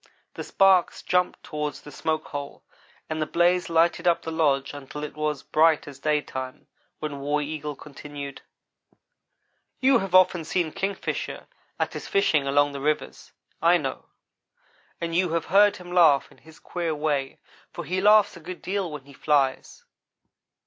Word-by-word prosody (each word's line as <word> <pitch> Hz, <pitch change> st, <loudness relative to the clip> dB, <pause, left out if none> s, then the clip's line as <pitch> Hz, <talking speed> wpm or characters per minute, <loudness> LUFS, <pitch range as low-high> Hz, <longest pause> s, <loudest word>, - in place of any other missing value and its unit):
The -, -, -6 dB
sparks 190 Hz, -2 st, +3 dB
jumped 180 Hz, 0 st, 0 dB
toward 150 Hz, -1 st, -4 dB
the 145 Hz, -, -12 dB
smoke 155 Hz, +2 st, -2 dB
hole 140 Hz, -1 st, -7 dB, 0.4 s
and 155 Hz, 0 st, -3 dB
the 155 Hz, -, 0 dB
blaze 175 Hz, +2 st, +2 dB
lighted 170 Hz, +1 st, +2 dB
up 170 Hz, -, +3 dB
the 160 Hz, -, -4 dB
lodge 145 Hz, -4 st, +1 dB
until 145 Hz, +1 st, -8 dB
it 150 Hz, -, -6 dB
was 150 Hz, -2 st, -2 dB
bright 155 Hz, -1 st, +3 dB
as 140 Hz, -1 st, -10 dB
daytime, 135 Hz, -3 st, -2 dB, 0.3 s
when 150 Hz, -2 st, -5 dB
War 145 Hz, +2 st, 0 dB
Eagle 150 Hz, 0 st, -4 dB
continued: 145 Hz, 0 st, -9 dB, 1.4 s
"You 265 Hz, -1 st, +4 dB
have 190 Hz, -3 st, -2 dB
often 180 Hz, -2 st, +5 dB
seen 165 Hz, 0 st, -1 dB
Kingfisher 195 Hz, +3 st, -4 dB, 0.3 s
at -, -, -1 dB
his -, -, -6 dB
fishing 395 Hz, -, +2 dB
along 145 Hz, +1 st, +3 dB
the 140 Hz, -1 st, -6 dB
rivers, 150 Hz, +1 st, -2 dB, 0.3 s
I 170 Hz, +2 st, +5 dB
know; 135 Hz, -5 st, -5 dB, 0.9 s
and 170 Hz, -1 st, -3 dB
you 175 Hz, -1 st, +1 dB
have 170 Hz, -, 0 dB
heard 205 Hz, +1 st, +6 dB
him 180 Hz, -1 st, -11 dB
laugh 160 Hz, -6 st, +4 dB
in -, -, -20 dB
his 160 Hz, 0 st, -17 dB
queer 170 Hz, -3 st, -3 dB
way, 145 Hz, -3 st, -1 dB, 0.3 s
for -, -, -7 dB
he 185 Hz, +2 st, -1 dB
laughs 210 Hz, 0 st, +5 dB
a -, -, -10 dB
good 175 Hz, +2 st, -9 dB
deal 190 Hz, -3 st, -2 dB
when 150 Hz, -3 st, -8 dB
he 140 Hz, -, -15 dB
flies. 140 Hz, -2 st, 0 dB
155 Hz, 165 wpm, -25 LUFS, 145-175 Hz, 1.4 s, heard